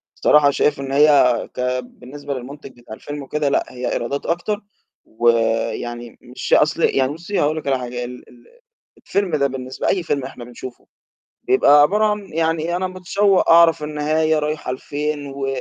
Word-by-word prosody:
الصراحة 145 -1 +4
شايف 145 0 +1
إن 135 -1 -5
هي 140 -4 +4
كبالنسبة 125 +3 -5
للمُنتِج 135 0 -9
بتاع 110 -2 -10
الفيلم 145 +4 -8
وكده 145 +1 -1
لأ، - - +1
هي 125 0 -4
إيرادات 140 +4 -3
أكتر 205 +5 -2 0.4
ويعني 115 +1 -1
مش 125 +1 -5
أصل 155 +2 +3
يعني 135 +1 +2
بُصّي 170 +5 -4
هاقول 155 +2 +1
لِك 150 - -6
على 135 -1 +1
حاجة، 125 0 -5
ال 125 0 -11
ال 120 -1 -20 0.5
الفيلم 195 -6 -1
ده 140 -1 +2
بالنسبة 130 -1 -5
لأي 185 -3 +1
فيلم 140 -4 -2
إحنا 130 -2 -8
بنشوفه 125 +1 -11 0.6
بيبقى 380 - +5
عبارة 210 +8 +3
عن 210 -2 -2
يعني 165 +1 0
أنا 185 +1 -1
متشوّق 185 +1 +1
أعرف 165 -2 +6
النهاية 155 +1 0
رايحة 150 -3 -3
لفين 145 +2 -4
و 135 0 -5
145 Hz, 160 wpm, -20 LUFS, 125-160 Hz, 0.6 s, أعرف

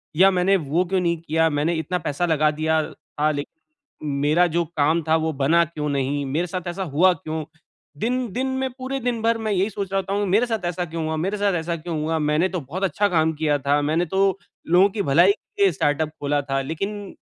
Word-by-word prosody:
या 190 +4 +6
मैंने 185 +1 +3
वो 165 +2 0
क्यों 185 +1 0
नहीं 170 -1 +1
किया, 160 0 +1
मैंने 150 +3 0
इतना 170 +3 -2
पैसा 150 +2 -1
लगा 155 -2 +2
दिया 155 +1 +1
था 150 +1 -2
लेक़िन 145 -1 -4 0.7
मेरा 155 +5 +4
जो 170 0 0
काम 155 +3 +2
था 160 - +4
वो 160 0 -1
बना 155 +5 +3
क्यों 150 -2 -5
नहीं? 140 0 -1
मेरे 155 +6 -1
साथ 180 +1 -5
ऐसा 180 +3 -4
हुआ 180 +2 +3
क्यों? 155 -1 -5 0.6
दिन 250 +1 -1
दिन 255 +5 -1
में 265 0 0
पूरे 260 +1 -3
दिन 240 -2 -1
भर 230 0 +2
मैं 215 - 0
यही 195 +2 +1
सोच 195 -1 -5
रहा 195 - +2
था 190 +1 -5
हूँ 205 0 0
मेरे 210 +6 +3
साथ 225 -5 -3
ऐसा 175 +1 -2
क्यों 165 0 -5
हुआ 160 0 -2
मेरे 190 +6 -1
साथ 200 -2 +1
ऐसा 170 0 -2
क्यों 165 0 -5
हुआ? 160 +1 0
मैंने 150 +4 +1
तो 185 -2 -3
बहुत 155 +7 -6
अच्छा 205 +2 +1
काम 160 -3 +2
किया 150 -1 +1
था। 140 +1 +1
मैंने 155 +4 +1
तो 190 +2 +1 0.4
लोगों 190 +3 +7
की 205 +1 -2
भलाई 175 +5 +5
के 405 - -6
लिए 395 - +5
स्टार्टअप 150 0 0
ख़ोला 145 -1 -1
था 135 0 +1
लेक़िन 195 +8 -5
170 Hz, 230 wpm, -23 LUFS, 155-195 Hz, 0.7 s, लोगों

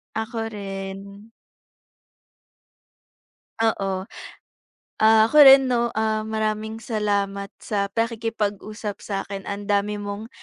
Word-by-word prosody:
Ako 225 +1 -3
rin. 200 0 -7 2.3
Oo. 195 -4 0 1.0
Ah, 220 0 +6
ako 300 - -2
rin 270 -1 +9
'no, 235 -1 +1
ah, 220 0 0
maraming 220 0 -2
salamat 200 -3 -1
sa 200 -2 -2
pakikipag-usap 215 -2 -3
sa 195 -2 -3
'kin. 195 -1 -6
Ang 200 0 -5
dami 205 +1 +1
mong 205 +2 -6
210 Hz, 100 wpm, -23 LUFS, 200-220 Hz, 2.3 s, rin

